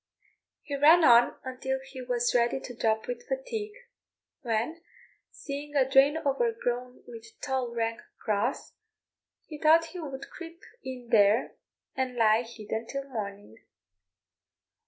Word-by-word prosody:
He 285 - -4
ran 315 +5 +6
on 240 -3 +6
until 260 +1 -3
he 265 -1 -9
was 245 -1 0
ready 240 +2 +2
to 245 -2 -9
drop 220 -1 0
with 485 -1 -6
fatigue, 455 -4 -4 0.7
when, 240 +7 -2 0.5
seeing 290 +1 -7
a 265 -2 +4
drain 270 +3 +5
overgrown 275 - -2
with 230 -1 -12
tall, 260 -3 -2
rank 230 0 -2 0.2
grass, 215 +5 -2 0.7
he 305 -2 -9
thought 325 +2 +5
he 360 - -6
would 275 -4 -7
creep 335 -1 -10 0.2
in 250 -2 -8
there 210 +2 +4 0.4
and 260 -1 -2
lie 220 -1 +4
hidden 225 -1 -6
till 275 +1 -5
morning. 200 - -6
260 Hz, 130 wpm, -28 LUFS, 235-295 Hz, 0.7 s, ran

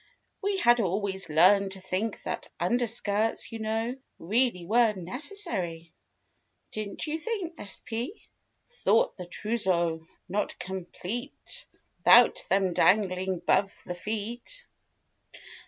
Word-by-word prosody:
We 400 -1 0
had 240 -8 +5
always 195 -1 0
learned 190 +5 +5
to 190 - -6
think 190 +4 -3
that - - -4
Underskirts, 225 -2 0
you 225 - -6
know. 225 +3 -1 0.2
Really 210 0 +1
were 225 +2 +4
necessary— 185 - -2 0.8
Didn't 215 -2 -3
you 315 +1 -2
think 360 -3 -4
sp? 230 - -4 0.5
Thought 485 +1 +2
the 180 -2 -7
trouseau 175 -6 0 0.2
not 200 +3 -2
complete 190 - -6 0.4
'Thout - - +7
them 190 -2 +2
dangling 185 -2 +2
'bove 195 +1 +2
the 180 - -4
feet. 225 - -4
210 Hz, 105 wpm, -28 LUFS, 185-240 Hz, 0.8 s, Thout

